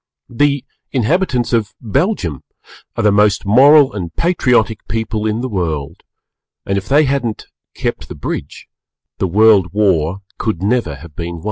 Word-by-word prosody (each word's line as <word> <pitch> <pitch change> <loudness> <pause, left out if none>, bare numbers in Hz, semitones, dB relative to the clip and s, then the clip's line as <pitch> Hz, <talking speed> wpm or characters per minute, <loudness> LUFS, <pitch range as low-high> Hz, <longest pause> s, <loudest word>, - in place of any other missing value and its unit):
The 140 +1 +1 0.3
inhabitants 130 - 0
of 110 -4 0
Belgium 115 - -1 0.5
are 115 - -1
the 105 - +4
most 105 -1 +2
Moral 135 +6 +6
and 90 -5 -5
Patriotic 125 - +1
people 110 0 -2
in 110 +2 -1
the 130 - -2
World, 80 - -3 0.6
and 100 - -1
if 100 +1 -4
they 145 +3 +5
hadn't 130 -5 -2 0.3
"kept - - -4
the - - -7
bridge" - - -6 0.5
the 95 - +1
World 105 0 +4
War 95 -3 +1 0.2
could 105 -6 -2
never 105 - 0
have 75 +2 -14
been 85 0 -5
won. 85 - -8
110 Hz, 150 wpm, -17 LUFS, 95-125 Hz, 0.6 s, Moral